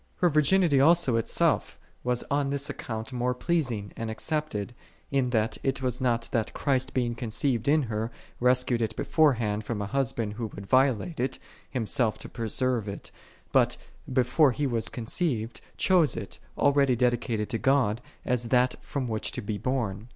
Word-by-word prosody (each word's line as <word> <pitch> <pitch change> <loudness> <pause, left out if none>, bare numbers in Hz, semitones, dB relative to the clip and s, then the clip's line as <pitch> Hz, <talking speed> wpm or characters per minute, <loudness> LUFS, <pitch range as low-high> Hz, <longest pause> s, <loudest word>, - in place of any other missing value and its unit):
4. 175 - +3
Her - - -6
virginity 155 0 +4
also 165 -4 +4
itself 115 - +1 0.2
was 125 -1 0
on 140 -1 +1
this 140 +1 -1
ac - - -10
count 110 +2 -5
more 125 0 0
pleasing 125 - -1
and 115 -1 -4
accepted, 120 -3 -2 0.4
in 135 -2 +1
that 110 -2 0
it 135 0 -1
was 125 -1 -1
not 120 -2 +1
that 115 -2 -1
Christ 135 -1 0
being 120 -2 +1
conceived 120 +1 -1
in 150 +1 +4
her, 110 -1 -2 0.3
rescued 125 -1 +2
it 110 -1 -1
beforehand 115 -11 +2
from 105 0 -3
a 100 - -2
husband 115 -3 -1
who 115 +1 -4
would 100 - -8
violate 130 - +2
it, 130 +1 -1 0.3
Himself 120 -2 0
to - - -9
preserve 120 0 -1
it; 100 - -7 0.4
but, - - +3 0.3
before 130 +2 +3
He 145 +4 -1
was 120 -4 +1
conceived, 120 -1 -2 0.2
chose 180 -6 +3
it, - - -6 0.2
already 140 -2 +3
dedicated 120 -3 0
to 115 - -2
God, 125 -5 +2 0.2
as 125 -1 0
that 125 +1 +1
from 135 -3 -3
which 110 -2 -2
to - - -4
be 105 0 -3
born. 115 -4 -2
125 Hz, 170 wpm, -27 LUFS, 115-140 Hz, 0.4 s, virginity